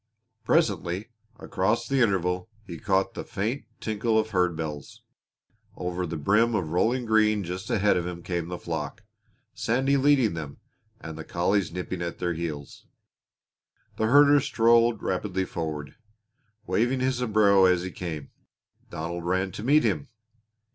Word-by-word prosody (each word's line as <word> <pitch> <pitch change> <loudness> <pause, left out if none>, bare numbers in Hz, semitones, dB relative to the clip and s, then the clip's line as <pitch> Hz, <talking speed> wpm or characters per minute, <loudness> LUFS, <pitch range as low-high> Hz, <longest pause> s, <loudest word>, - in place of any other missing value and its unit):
Presently 110 - 0 0.3
across 115 +2 -1
the 135 0 +1
intervale 90 -2 +1 0.2
he 85 -4 -8
caught 95 +1 +1
the - - -5
faint 115 +8 -3
tinkle 110 +1 0
of 110 0 0
herd 90 -3 +1
bells. 75 -3 -6 0.7
Over 90 0 -3
the 80 - -4
brim 105 +9 +2
of 85 -6 -2
rolling 120 +8 +1
green 110 -2 +3
just 90 +1 -6
ahead 105 -1 +3
of 90 0 -2
him 85 -1 -7
came 85 -2 -3
the 90 0 -5
flock, 80 +5 -5 0.5
Sandy 135 +4 +1
leading 135 -7 +3
them, 75 -4 -6 0.4
and 80 0 -8
the - - -5
collies 90 +3 0
nipping 90 0 -5
at 85 -1 -4
their 90 -1 -1
heels. 80 -4 -6 1.1
The 110 - +1
herder 145 +3 +6
strode 115 -2 +3
rapidly 95 0 -1
forward, 75 -4 -5 0.7
waving 120 +4 +1
his 130 -1 0
sombrero 105 -5 +4
as 90 -1 +3
he 95 - -5
came. 80 -5 -6 0.6
Donald 85 +2 -5
ran 95 +2 0
to 105 - -7
meet 150 +5 +4
him. 145 - 0
95 Hz, 150 wpm, -26 LUFS, 85-115 Hz, 1.1 s, herder